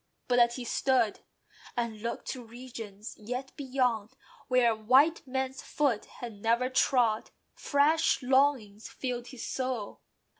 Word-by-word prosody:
But 245 -1 +3
as 235 0 +4
he 255 - -5
stood, 240 -2 +1 0.6
And 230 -3 -2
looked 235 +1 -4
to 255 - -5
"regions" 225 -3 -9
yet 250 +5 -5
"beyond," 250 -6 -1 0.3
where 240 -2 +4
white 265 +9 +3
man's 265 0 -2
foot 270 -8 0
Had 225 -4 -9
never 235 +3 +2
trod, 245 -4 +2 0.2
fresh 310 +1 +2
longings 255 -6 +2
filled 245 -2 -4
his 255 -4 -7
soul. 255 -5 -3
250 Hz, 125 wpm, -30 LUFS, 225-265 Hz, 0.6 s, as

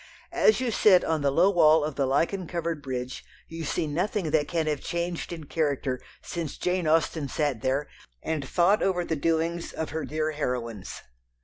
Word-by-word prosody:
As 435 - +4
you 255 -2 0
sit 195 -4 +5
on 160 -2 0
the 140 - +2
low 175 +8 +4
wall 160 -4 +5
of 150 0 -2
the 135 -1 0
lichen 170 +7 0
covered 170 -3 -3
bridge 130 -2 -5 0.2
you 165 0 -6
see 155 - -1
nothing 170 +3 -1
that 150 -2 +2
can 165 -2 0
have 150 -2 -1
changed 170 0 -3
in 165 -2 -6
character 140 -4 -1 0.2
since 165 -4 -5
Jane 180 -2 0
Austen 160 -1 +2
sat 140 -5 -1
there 135 +4 0 0.4
and 155 -3 -2
thought 185 +4 +3
over 180 -2 +1
the 160 - -1
doings 165 +2 -1
of 160 - -4
her 160 0 -3
dear 155 +3 -1
heroines. 120 -8 -4
160 Hz, 185 wpm, -27 LUFS, 145-170 Hz, 0.4 s, sit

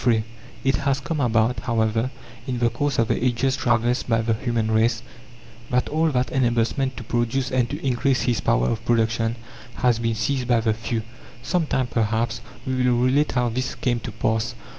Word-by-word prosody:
III 110 -2 +4 0.4
It 135 0 +2
has 140 -1 0
come 150 +3 -3
about, 115 -2 +2
however, 115 0 0 0.4
in 125 -2 -2
the 120 -1 +2
course 145 +4 -1
of 115 - +2
the - - 0
ages 130 +1 +1
traversed 120 -1 +1
by 115 -1 +2
the 115 0 +1
human 115 -1 -1
race, 110 +1 +2 0.7
that 125 0 +1
all 160 +2 +2
that 125 -3 0
enables 120 -3 +1
man 135 -2 +1
to 125 - -6
produce 120 +3 -1
and 125 -2 +1
to 145 +4 -4
increase 130 +1 +1
his 120 -3 0
power - - +2
of 115 0 -2
production 115 -1 +1 0.4
has 125 -3 +2
been 115 -1 0
seized 125 +3 -1
by 120 -2 +3
the 110 -1 +1
few. 110 +1 -3 0.4
Some 165 +4 0
time, 130 -3 +1
perhaps, 115 0 -1 0.2
we 130 - -1 0.2
will 120 - +3
relate 130 +5 +2
how 125 -1 +1
this 130 +2 -3
came 120 -2 0
to - - -6
pass. 110 0 -1
120 Hz, 195 wpm, -23 LUFS, 115-130 Hz, 0.7 s, III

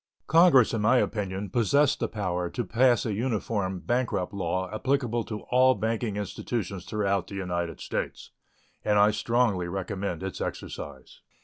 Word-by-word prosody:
Congress, 160 -9 +5
in 110 - 0
my 120 +5 +4
opinion, 100 -4 -1
possess 140 +5 +3
the - - -2
power 90 -4 -2
to 120 - -3
pass 120 +4 +3
a 110 - -1
uniform 100 -4 -1
bankrupt 120 -5 -1
law 95 -1 -1
applicable 120 -1 0
to 105 -1 -6
all 130 +1 +5
banking 110 0 -2
institutions 100 -2 -4
throughout 100 -4 -1
the 100 - -8
United 85 -3 -3
States, - - -4 0.5
and 105 -1 +2
I 105 +1 +6
strongly 105 -4 +1
recommend 95 -1 -4
its 95 -2 -5
exercise. - - -7
105 Hz, 145 wpm, -27 LUFS, 95-120 Hz, 0.5 s, I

